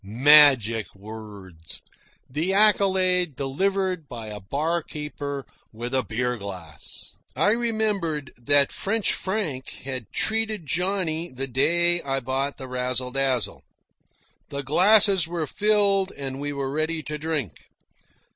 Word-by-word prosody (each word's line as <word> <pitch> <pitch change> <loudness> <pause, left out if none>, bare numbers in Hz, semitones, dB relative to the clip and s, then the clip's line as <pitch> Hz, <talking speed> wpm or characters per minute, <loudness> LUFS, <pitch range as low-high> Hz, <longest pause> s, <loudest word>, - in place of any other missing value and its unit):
Magic 120 -1 +5
words! 100 -5 -11 0.5
The 160 +8 -1
accolade 185 -5 +3
delivered 185 +4 -1
by 115 -4 -7
a 105 -1 -7
barkeeper 150 - -4 0.3
with 120 +3 -6
a 130 - +2
beer 125 +1 -2
glass! 90 -7 -6 0.2
I 165 +10 +3
remembered 210 - -1
that 140 +3 +3
French 220 +1 0
Frank 185 -10 -3
had 130 -3 -5
treated 220 -4 -1
Johnny 175 +1 0
the 130 +1 -2
day 170 +7 +3
I 135 -1 -2
bought 135 +2 -2
the 130 - -8
Razzle 125 0 -2
Dazzle. 135 -3 -1 0.9
The 140 0 -4
glasses 190 - +5
were 170 -2 -2
filled 200 +1 +2
and 135 -1 -6
we 145 0 -3
were 140 -1 -3
ready 155 +2 -1
to 150 0 -5
drink. 150 - -2
145 Hz, 120 wpm, -24 LUFS, 125-180 Hz, 0.9 s, Magic